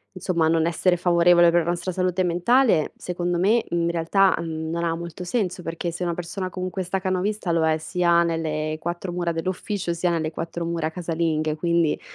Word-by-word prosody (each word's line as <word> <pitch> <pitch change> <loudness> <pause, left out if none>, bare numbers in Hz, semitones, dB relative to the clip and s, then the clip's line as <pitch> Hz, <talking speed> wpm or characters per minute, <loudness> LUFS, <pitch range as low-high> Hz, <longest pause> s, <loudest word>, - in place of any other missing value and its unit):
insomma, 175 -3 0
non 160 0 +2
essere 175 +2 +2
favorevole 175 0 +5
per 170 0 +3
la 170 - -2
nostra 175 +1 -2
salute 185 0 0
mentale, 180 - +2
secondo 175 -1 -2
me, 215 +6 +3
in 170 0 0
realtà, 170 +3 +3
mhmm 160 -1 -4
non 170 +1 -2
ha 165 -1 0
molto 170 +1 -7
senso, 180 -2 -2
perché 165 +1 -3
se 175 +2 -5
una 170 -1 -1
persona 185 +2 -5
comunque 185 +1 -4
è - - -10
stacanovista 190 +1 -1
lo 165 -1 +2
è 160 0 +2
sia 170 +1 +2
nelle 155 -2 -2
4 175 +2 -4
mura 175 -1 -1
dell'ufficio, 180 +3 -3
sia 175 +1 0
nelle 160 -2 -1
4 170 +1 -5
mura 165 -2 -2
casalinghe, 160 -3 -1
quindi 170 -1 +1
170 Hz, 190 wpm, -24 LUFS, 165-180 Hz, -, favorevole